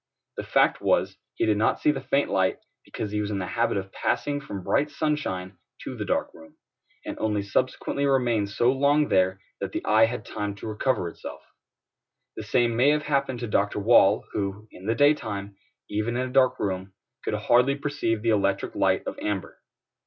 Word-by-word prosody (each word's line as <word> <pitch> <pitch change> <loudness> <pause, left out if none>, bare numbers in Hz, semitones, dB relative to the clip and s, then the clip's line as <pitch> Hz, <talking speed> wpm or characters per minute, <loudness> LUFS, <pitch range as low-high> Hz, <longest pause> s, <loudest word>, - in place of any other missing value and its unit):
The - - -3
fact - - +2
was, - - +1 0.2
he - - +1
did 105 -1 +2
not 110 - +2
see 150 - +3
the 135 -2 -4
faint 140 +2 0
light, 95 -1 +2 0.3
because 105 - -5
he 105 0 -1
was 105 - -3
in 105 - -2
the 95 - -2
habit 115 +3 0
of 95 0 -5
passing 145 0 -1
from 100 -8 -7
bright 150 +9 +1
sunshine 100 - -2 0.2
to - - -6
the - - -4
dark - - -1
room, 80 0 -16 0.5
and - - -6
only 105 -2 0
subsequently 130 +6 -1
remained 120 -6 +1
so 120 +4 +2
long 145 +2 +2
there 95 0 +2 0.2
that - - -4
the - - -3
eye 110 +1 +5
had 115 -2 -5
time 105 -1 -4
to - - -10
recover 110 -2 0
itself. 85 - -9 0.9
The - - -5
same 120 -1 +1
may 125 +5 +4
have 150 0 +2
happened 135 -4 -1
to 120 - -3
Doctor 105 -1 0
Wall, 105 -1 +5
who, 100 +1 -3
in 95 - -11
the 115 - +1
daytime, 110 -9 +1 0.3
even 110 +3 -2
in 130 0 -1
a 125 - -9
dark 130 -2 +4
room, 95 -1 -3 0.3
could - - -1
hardly 125 +3 +3
perceive 140 -6 -2
the 115 - +1
electric 100 -2 0
light - - +1
of - - -5
amber. 100 -4 -4
110 Hz, 195 wpm, -26 LUFS, 100-135 Hz, 0.9 s, eye